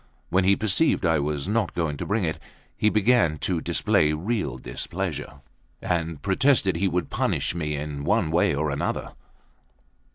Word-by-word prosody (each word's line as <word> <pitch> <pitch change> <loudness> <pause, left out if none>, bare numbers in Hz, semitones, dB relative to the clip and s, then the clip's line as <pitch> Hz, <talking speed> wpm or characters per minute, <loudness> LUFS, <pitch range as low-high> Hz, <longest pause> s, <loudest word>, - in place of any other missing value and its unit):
When 95 +1 +2
he 100 +1 +5
perceived 110 - +2
I 80 -2 +3
was 75 0 -2
not 110 +2 0
going 80 -4 -1
to - - -5
bring 105 0 0
it, 80 -2 -2 0.4
he 105 - +2
began 105 -7 +3
to 90 -4 -1
display 75 -1 +2
real 90 - -2
displeasure, 75 +6 -5 0.4
and 85 -3 -2
protested 100 - +3
he 95 +3 +1
would 90 -4 -2
punish - - 0
me 75 -3 -2
in 70 -1 -5
one 80 - +1
way 85 -3 +2
or 75 0 -1
another. 70 - -2
85 Hz, 160 wpm, -25 LUFS, 75-100 Hz, 0.4 s, he